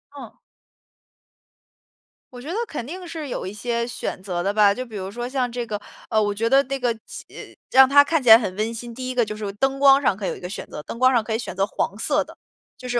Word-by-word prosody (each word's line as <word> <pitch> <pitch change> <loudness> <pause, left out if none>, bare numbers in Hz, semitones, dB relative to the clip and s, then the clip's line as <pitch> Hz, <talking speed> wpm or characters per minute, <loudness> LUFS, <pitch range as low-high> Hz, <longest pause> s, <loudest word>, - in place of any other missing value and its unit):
嗯。 250 -6 -10 2.0
我 245 - -9
觉 285 - -11
得 350 - -3
肯 270 - -5
定 360 +3 -7
是 320 -3 -6
有 - - -4
一 190 - -6
些 235 +2 -2
选 235 - -5
择 180 -2 -3
的 195 +2 0
吧， 205 -1 +4
就 255 - -5
比 230 -4 -12
如 190 0 -5
说 240 +3 -5
像 255 -2 -1
这 240 -1 -4
个 210 -1 -3 0.3
呃， 220 - +2
我 205 -1 0
觉 225 +3 -1
得 275 +2 +5
那 275 +1 -4
个 245 -1 +1
起 - - -9 0.5
让 265 0 +7
它 285 +1 +7
看 320 +1 0
起 - - -7
来 225 0 +10
很 195 -6 -4
温 220 +3 -2
馨， 235 +1 -7
第 255 +2 -6
一 - - -4
个 245 -2 +2
就 215 0 -5
是 205 -2 -5
灯 270 +5 0
光 275 0 +6
上 195 -8 +1
可 200 - -5
以 - - 0
有 - - -4
一 - - -11
个 180 - -7
选 195 - -6
择。 - - -8
灯 230 - -8
光 255 +1 +4
上 230 -3 +2
可 225 - -7
以 - - +1
选 225 - -6
择 195 - +1
黄 195 - -2
色 295 +5 +1
的， - - -15 0.4
就 250 - -9
是 240 0 +1
235 Hz, 290 characters per minute, -23 LUFS, 210-265 Hz, 2.0 s, 来